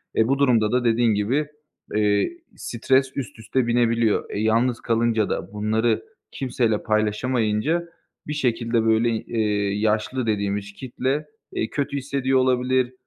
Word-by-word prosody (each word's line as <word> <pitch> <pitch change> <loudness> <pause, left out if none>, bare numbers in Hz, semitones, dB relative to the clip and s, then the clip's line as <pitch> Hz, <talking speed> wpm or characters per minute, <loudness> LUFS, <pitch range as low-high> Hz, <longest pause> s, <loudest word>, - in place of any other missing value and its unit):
Eee, 110 - +3
bu 135 +2 +1
durumda 115 -6 +3
da 125 0 +1
dediğin 115 0 +3
gibi, 125 +9 0 0.5
eee, 105 - +2 0.2
stres 130 +3 +1
üst 125 -4 -5
üste 120 +2 -1
binebiliyor. 115 -2 +2
Eee, - - -4
yalnız 115 +2 +1
kalınca 115 -2 +1
da, 90 +5 -4
bunları 110 +2 0 0.3
kimseyle 120 -5 -1
paylaşamayınca 110 +8 0 0.4
bir 150 - -2
şekilde, 120 -4 0
böyle, 110 +1 +3
eee, 105 -3 -1
yaşlı 110 +3 0
dediğimiz 100 -1 -1
kitle, 130 +5 -3 0.3
eee, 110 - -1
kötü 140 0 -2
hissediyor 135 -1 0
olabilir. 130 0 +1
115 Hz, 135 wpm, -23 LUFS, 110-130 Hz, 0.5 s, Eee